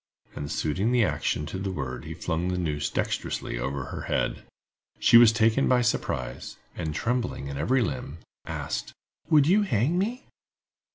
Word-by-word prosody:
And 75 0 -5
suiting 95 +10 0
the 125 -2 +4
action 75 -4 -1
to 75 +5 -5
the 95 0 -2
word 65 -8 -5
he - - -6
flung 85 +2 -2
the 90 0 -1
noose 75 -4 -1
dextrously - - -2
over 65 +2 -2
her - - -6
head. - - -1 0.6
She - - +5
was 115 -1 +9
taken 115 +4 +3
by 125 -1 +4
surprise, 85 - -2 0.2
and 80 -1 -4
trembling 120 - -2
in 70 - -5
every 125 - +2
limb, 80 -7 -4 0.3
asked: - - -4 0.4
"Would 150 -3 +6
you 195 +7 +4
hang 165 - +1
me?" 235 +7 -2
100 Hz, 165 wpm, -27 LUFS, 75-125 Hz, 0.6 s, was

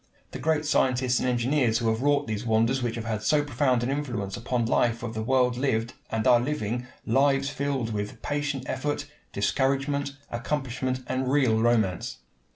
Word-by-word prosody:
The - - -6
great 155 -1 +1
scientists 130 -3 +2
and 130 - 0
engineers 125 -1 +2
who 115 - -1
have 110 +1 0
wrought 145 +1 +2
these 110 0 -3
wonders 115 +3 +2
which 120 -2 -1
have 115 -1 -5
had 110 -2 -2
so 145 +6 +3
profound 130 -3 +1
an 125 - 0
influence 120 -9 -3
upon 120 0 -1
the 115 - -3
life 115 -1 +2
of 115 -2 -4
the 110 - -3
world 125 +1 +2
lived, 120 -3 0 0.2
and 110 -1 -1
are 125 -2 +6
living, 125 -2 -2 0.2
lives 135 +3 +2
filled 135 -5 -2
with 105 0 -4
patient 145 -2 -2
effort, 145 +2 -2 0.3
discouragement, 140 +6 0
accomplishment, 130 +1 -2
and 130 +1 -1
real 130 -6 +3
romance. 110 -6 +1
125 Hz, 175 wpm, -27 LUFS, 115-140 Hz, 0.3 s, are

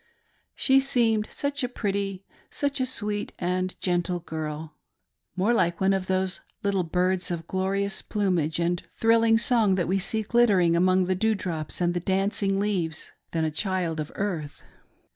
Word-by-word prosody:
She 270 -1 +4
seemed 230 -5 +1
such 285 -1 -2
a 250 - 0
pretty, 200 -4 -3 0.2
such 285 -1 -2
a 255 - +1
sweet 210 -4 -2
and 185 +1 -2
gentle 175 0 0
girl 155 -1 -5 0.3
— - - -55
more 195 +6 +2
like 175 -6 +1
one 195 0 +3
of 190 -1 -2
those 190 0 0 0.2
little 200 -2 +1
birds 180 +1 0
of 170 -2 -3
glorious 195 +2 -1
plumage 180 -7 0
and 175 0 0 0.2
thrilling 225 0 +4
song 225 -4 +3
that 180 -2 0
we 190 +2 +1
see 220 +3 0
glittering 205 -7 +3
among 185 +1 +3
the 185 - +1
dew 220 +4 +1
drops 165 -4 -3
and 175 0 +2
the 175 - -1
dancing 195 +2 0
leaves, 180 -7 -2 0.2
than 165 -1 -1
a 155 - -1
child 175 -1 -1
of 150 0 -4
earth. 170 -8 -4
190 Hz, 165 wpm, -26 LUFS, 175-210 Hz, 0.3 s, She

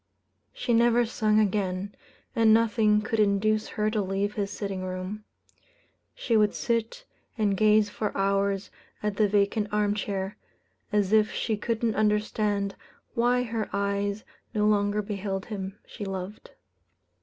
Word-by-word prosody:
She - - -2
never 235 +1 +4
sung 215 -2 +2
again, 200 -1 0 0.4
and 225 -1 +5
nothing 220 -1 +3
could 220 +1 -1
induce 215 +1 +2
her 215 0 -1
to 215 -1 0
leave 195 +2 -1
his 200 -2 -2
sitting 200 -2 -4
room. 185 +3 -5 0.9
She 235 - 0
would 210 -1 +3
sit 235 - -2 0.3
and 205 -3 +2
gaze 215 +1 +4
for 210 0 -2
hours 195 0 0 0.3
at 210 -2 -1
the 215 - +4
vacant 205 +1 +2
arm 210 -1 +2
chair, 195 -1 -3 0.5
as 205 -1 +1
if 215 0 +4
she 220 - -1
couldn't 230 +1 -1
understand 210 -1 0 0.4
why 245 +1 +2
her 225 -2 -3
eyes 200 +1 -1 0.3
no 210 0 +2
longer 210 0 +2
beheld 195 -1 -3
him 195 -3 -6
she - - -8
loved. 195 +1 -6
210 Hz, 140 wpm, -27 LUFS, 200-215 Hz, 0.9 s, and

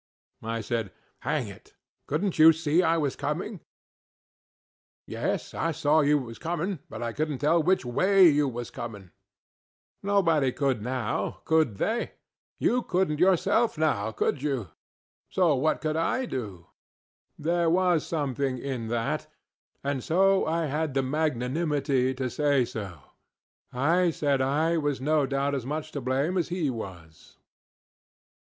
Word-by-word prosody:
I 115 0 -3
said, 110 -2 -3 0.3
ŌĆ£Hang - - -1
it! - - -17 0.3
CouldnŌĆÖt 165 +4 -1
you 160 +1 +9
SEE 160 +1 +2
I 165 -2 +2
was 145 -4 -1
coming? 175 +7 -3 1.5
ŌĆØ - - -8
ŌĆ£Yes, - - -2
I 165 - -1
see 155 -1 +2
you 150 - +5
was 115 -4 -7
coming, 175 +2 -2
but - - -6
I 115 -1 -3
couldnŌĆÖt 150 -1 -2
tell 165 +5 +3
which 180 -2 +2
WAY 185 +10 +5
you 145 -2 +3
was 120 -1 -6
coming. 105 -6 -8 0.9
Nobody 165 -9 +2
couldŌĆönow, 125 -6 -2
_could 160 -9 +2
_they? 225 - -1 0.4
You 250 +1 +2
couldnŌĆÖt 180 -8 0
yourselfŌĆönow, 165 - +2
could 140 - 0
you? 135 - -2 0.6
So 180 -5 +3
what 145 +4 +1
could 155 -1 -1
I 250 +11 0
do? 100 - -6
ŌĆØ - - -36 0.7
There 170 0 +2
was 175 -1 +3
something 140 -4 -2
in 125 -3 -4
that, 115 0 -2 0.6
and 140 -2 -2
so 190 +3 +3
I 165 +1 0
had 150 0 -2
the 135 - +2
magnanimity 140 -1 0
to 130 0 -2
say 140 -2 +2
so. 95 -9 -7 0.7
I 165 +8 +2
said 145 -4 0
I 155 +5 +1
was 145 -3 -1
no 150 +1 +1
doubt 140 +1 0
as 130 -3 -3
much 150 +2 -4
to 140 - -4
blame 135 +9 0
as 170 - -2
he 170 -6 -1
was. 90 -9 -10
145 Hz, 145 wpm, -27 LUFS, 130-165 Hz, 1.5 s, you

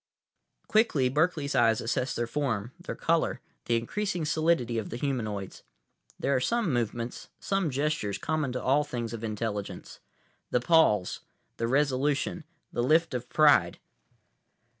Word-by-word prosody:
———— - - -46
Quickly, 215 - +3
Berkeley's 150 0 +1
eyes 115 -2 +4
assessed 130 +3 -1
their 120 - 0
form, 115 -4 -2
their 175 - -6
color, 165 0 +1 0.3
the 120 - +1
increasing 175 - -2
solidity 155 -7 +1
of 110 - -6
the 120 - -5
humanoids. 110 -8 -3 0.6
There 140 - 0
are - - +3
some 225 - 0
movements, 120 0 -3
some 195 -4 0
gestures, 140 -7 -1
common 155 -4 -1
to 125 - -4
all 140 +3 +3
things 120 -5 -4
of 115 -1 -6
intelligence—the 110 +2 -5
pause, 120 - +3 0.4
the 115 - -1
resolution, 145 +4 0 0.3
the - - 0
lift 160 +5 +3
of 125 -1 -4
pride. 110 - +4
130 Hz, 140 wpm, -28 LUFS, 115-155 Hz, 0.6 s, eyes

